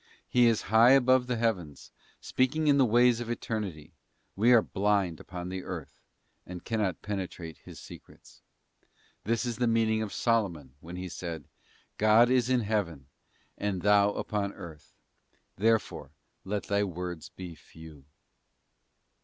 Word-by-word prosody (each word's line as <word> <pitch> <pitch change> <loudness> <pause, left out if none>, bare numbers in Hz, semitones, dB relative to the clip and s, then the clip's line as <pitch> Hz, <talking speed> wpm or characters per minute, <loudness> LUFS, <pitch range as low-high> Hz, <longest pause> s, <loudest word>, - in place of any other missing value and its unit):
He 125 -1 +4
is 115 -2 +1
high 115 +3 +7
above 130 -1 +4
the 125 - -1
heavens, 95 -11 -3 0.3
speaking 140 +5 0
in 145 -2 +4
the 130 - +5
ways 120 +1 +4
of 120 -1 -5
eternity; 105 -9 -5 0.4
we 115 +5 +3
are 120 -3 +6
blind 100 -4 0
upon 90 0 -7
earth, 90 -5 -7 0.4
and 90 -1 -9
cannot 110 -5 -2
penetrate 90 -5 -6
His - - -12
secrets. - - -15 0.8
This 115 +3 0
is 120 -3 -3
the 120 - +1
mean 115 -1 +2
ing 110 0 0
of 110 -2 -4
Solomon 90 - -1
when 85 +3 -10
he 90 +1 -5
said: 85 -3 -6 0.6
'God 110 +3 +5
is 125 -1 +2
in 125 -1 +2
Heaven, 90 - -3 0.5
and 100 -3 -2
thou 105 0 +4
upon 100 -2 -3
earth; 80 -3 -12 0.6
therefore 110 +1 0 0.3
let 100 +1 -3
thy 100 0 0
words 90 -3 -5
be 90 -2 -9
few. 80 -3 -15
105 Hz, 145 wpm, -29 LUFS, 90-115 Hz, 0.8 s, high